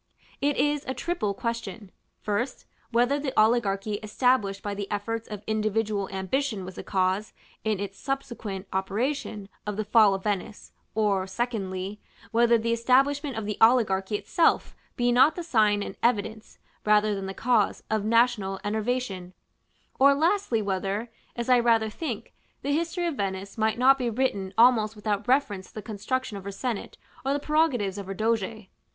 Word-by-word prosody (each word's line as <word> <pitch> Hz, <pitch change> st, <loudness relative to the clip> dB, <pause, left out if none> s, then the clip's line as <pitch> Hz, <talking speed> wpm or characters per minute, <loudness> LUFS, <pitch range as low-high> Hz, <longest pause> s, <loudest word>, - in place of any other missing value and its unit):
It 285 Hz, 0 st, +1 dB
is 295 Hz, 0 st, +1 dB
a 260 Hz, -, -2 dB
triple 240 Hz, -, -2 dB
question: 230 Hz, -3 st, -4 dB, 0.3 s
first, 230 Hz, +5 st, -2 dB, 0.2 s
whether 245 Hz, +4 st, +2 dB
the 275 Hz, -5 st, -1 dB
oligarchy 215 Hz, -2 st, +2 dB
established 215 Hz, -3 st, +1 dB
by 205 Hz, -, -3 dB
the 200 Hz, -1 st, -5 dB
efforts 225 Hz, +2 st, -3 dB
of 210 Hz, -1 st, -7 dB
individual 215 Hz, -2 st, 0 dB
ambition 195 Hz, +2 st, -2 dB
was 185 Hz, -, -8 dB
the -, -, -8 dB
cause, 190 Hz, +2 st, 0 dB, 0.3 s
in 215 Hz, -3 st, 0 dB
its 195 Hz, -1 st, -5 dB
subsequent 235 Hz, -8 st, -4 dB
operation, 205 Hz, +2 st, -2 dB, 0.2 s
of 210 Hz, -1 st, -3 dB
the 215 Hz, -, -1 dB
Fall 210 Hz, -2 st, +5 dB
of 190 Hz, -, -6 dB
Venice; 205 Hz, 0 st, -3 dB, 0.2 s
or 200 Hz, -3 st, +1 dB
(secondly) 195 Hz, -2 st, -3 dB, 0.3 s
whether 235 Hz, 0 st, +4 dB
the 230 Hz, +1 st, 0 dB
establishment 270 Hz, +3 st, +2 dB
of 220 Hz, -, -3 dB
the 210 Hz, 0 st, -4 dB
oligarchy 215 Hz, -4 st, +4 dB
itself 325 Hz, +10 st, +1 dB, 0.2 s
be 245 Hz, 0 st, +2 dB
not 260 Hz, +6 st, +5 dB
the 350 Hz, -, -4 dB
sign 215 Hz, -9 st, +2 dB
and -, -, -7 dB
evidence, 220 Hz, -2 st, -1 dB, 0.3 s
rather 210 Hz, 0 st, +3 dB
than 195 Hz, -1 st, -4 dB
the 195 Hz, -, -6 dB
cause, 235 Hz, -4 st, +1 dB
of 215 Hz, -2 st, +1 dB
national 220 Hz, -4 st, +2 dB
enervation; 210 Hz, -4 st, -2 dB, 0.7 s
or 280 Hz, +1 st, +6 dB
(lastly) 320 Hz, -, +1 dB
whether, 200 Hz, +4 st, -2 dB, 0.2 s
as 235 Hz, -1 st, -3 dB
I 250 Hz, -1 st, +5 dB
rather 225 Hz, -2 st, +3 dB
think, 320 Hz, +8 st, -5 dB, 0.3 s
the 285 Hz, -, -1 dB
history 335 Hz, +3 st, -1 dB
of 335 Hz, -, 0 dB
Venice 195 Hz, 0 st, -3 dB
might 220 Hz, 0 st, +1 dB
not 265 Hz, +2 st, +5 dB
be 245 Hz, -2 st, 0 dB
written 215 Hz, -5 st, -1 dB
almost 225 Hz, -2 st, +5 dB
without 210 Hz, +1 st, -2 dB
reference 230 Hz, -8 st, +1 dB
to -, -, -21 dB
the 215 Hz, -, -6 dB
construction 215 Hz, +1 st, -3 dB
of 195 Hz, -, -9 dB
her 200 Hz, -, -5 dB
senate 225 Hz, +1 st, -4 dB, 0.3 s
or 270 Hz, +1 st, +1 dB
the 285 Hz, -, 0 dB
prerogatives 275 Hz, -, +1 dB
of 195 Hz, -, -7 dB
her 195 Hz, -, -4 dB
Doge. 220 Hz, -1 st, -1 dB
220 Hz, 165 wpm, -26 LUFS, 200-250 Hz, 0.7 s, or